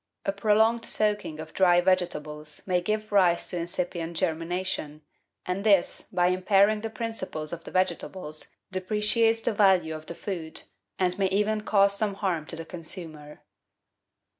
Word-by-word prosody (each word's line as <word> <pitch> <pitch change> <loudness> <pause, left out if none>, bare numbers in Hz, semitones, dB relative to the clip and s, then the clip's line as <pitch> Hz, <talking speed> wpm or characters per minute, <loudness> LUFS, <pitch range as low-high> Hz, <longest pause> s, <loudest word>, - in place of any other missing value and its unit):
A - - +2
prolonged 220 +3 +2
soaking 210 -7 0
of 155 0 -8
dry 175 -2 +5
vegetables 155 -5 -1
may 180 -2 +1
give 215 +3 -2
rise 180 -4 +3
to 180 - -3
incipient 170 -1 -3
germination, 165 -2 -2 0.4
and 180 +2 -2
this, 200 -5 +2
by 180 0 +3
impairing 200 +3 +3
the 225 - -3
principles 215 -9 -5
of 170 -1 -7
the - - -7
vegetables, 185 -3 -2 0.2
depreciates 215 +4 +2
the 225 - 0
value 190 -6 +3
of 155 0 -8
the 170 - -6
food, 165 -5 -2 0.3
and 180 +1 0
may 195 - +3
even 210 +3 +1
cause 200 -2 +3
some 205 -2 0
harm 175 -6 -2
to - - -2
the 165 0 -7
consumer. 160 -3 -6
185 Hz, 150 wpm, -27 LUFS, 165-205 Hz, 0.4 s, dry